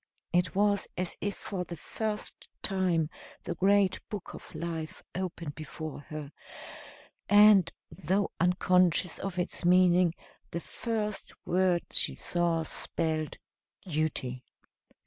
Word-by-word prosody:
It 175 -2 +2
was 205 0 +3
as 180 -1 -2
if 205 0 -1
for 190 -3 -4
the 175 -1 -7
first 215 +6 -2
time 180 -5 +1 0.3
the - - -3
great 195 +1 +3
book 205 -4 -6
of - - -11
life 165 -2 -5
opened 170 -4 -4
before 155 0 -7
her 150 -2 -6 1.0
and, 205 -4 +7 0.2
though 190 +3 0
unconscious 180 -1 +3
of 190 -2 -4
its 180 0 -2
meaning, 180 -1 +5 0.3
the 170 - -3
first 210 +2 -3
word 180 -1 +2
she - - +3
saw 170 -2 0
spelled 155 0 -2 0.5
Duty. 145 -6 -2
180 Hz, 115 wpm, -30 LUFS, 160-195 Hz, 1.0 s, and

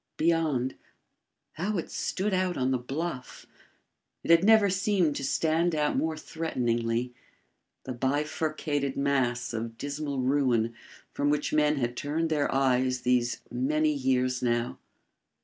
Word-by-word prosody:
Beyond... 155 -6 +1 0.8
how 195 +6 -2
it 170 - -4
stood 195 +2 -2
out 185 -1 0
on 130 0 +1
the 130 - +1
bluff! 135 +1 -5 0.8
it - - +1
had 170 +1 +6
never 220 0 +6
seemed 185 -5 +1
to - - -4
stand 160 +4 +1
out 150 -1 +1
more 160 -1 0
threateningly!... 120 -7 -2 0.7
the 130 - -5
bifurcated 145 +1 -1
mass 130 -4 0
of 115 0 -4
dismal 145 +1 -4
ruin 125 -4 +2 0.4
from 145 0 0
which 150 0 0
men 150 0 +3
had 120 -3 -2
turned 160 +5 -2
their 150 -2 +1
eyes 130 -1 +2
these 125 -1 +1
many 150 +5 +1
years 130 -2 0
now! 120 -1 -1
140 Hz, 130 wpm, -28 LUFS, 125-160 Hz, 0.8 s, had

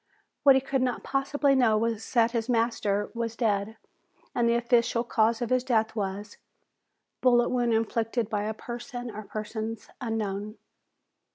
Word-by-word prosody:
What 275 -2 +7
he 265 - +3
could 270 0 -1
not 250 -2 -1
possibly 280 +1 +1
know 240 -5 +4
was 225 0 -2
that 230 -2 +4
his 230 0 -2
master 225 -4 0
was 230 -1 -3
dead 215 -2 0 0.6
and 235 -1 +2
the 235 - +3
official 235 0 +2
cause 230 0 +1
of 240 - -4
his 255 -1 +3
death 225 -3 +1
was, 200 0 -4 0.8
"Bullet 240 -1 +4
wound 240 -2 +1
inflicted 225 0 0
by 210 -1 -2
a 220 0 -3
person 240 +1 -6
or 215 - -5
persons 215 +1 -6
unknown." 215 -2 -3
230 Hz, 155 wpm, -27 LUFS, 215-245 Hz, 0.8 s, What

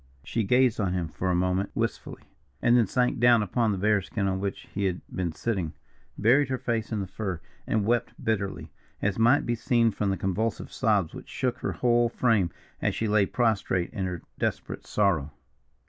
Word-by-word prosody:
She 115 - -1
gazed 125 +3 +3
on 95 -4 0
him 85 -3 -2
for 95 +3 -3
a 90 - +2
moment 90 +2 +1
wistfully, - - -3 0.4
and 120 +6 +4
then 120 -4 +4
sank 125 +4 +1
down 120 -2 +5
upon 110 +3 +1
the 100 - -1
bearskin 100 0 +1
on 95 -1 0
which 100 0 -4
he 100 0 -1
had 90 -2 -1
been 90 -2 -1
sitting, 90 -2 -2 0.4
buried 130 +6 +4
her 130 - 0
face 115 -3 -2
in 110 -2 -1
the - - -3
fur, 95 -1 -4 0.3
and 110 -2 +1
wept 120 +1 +1
bitterly, 100 -3 -2 0.3
as 105 +1 -1
might 120 +6 +4
be 120 - 0
seen 115 0 +2
from 100 0 -1
the 95 - 0
convulsive 105 +3 -2
sobs 105 -9 +1
which - - -10
shook 125 -2 -2
her - - -2
whole 120 -1 +2
frame 115 -7 +2 0.3
as - - 0
she 110 - -1
lay 105 -2 +3
prostrate 100 -6 0
in 100 -5 -2
her 90 -2 -4 0.2
desperate - - -3
sorrow. 85 -9 +1
105 Hz, 195 wpm, -27 LUFS, 95-120 Hz, 0.4 s, down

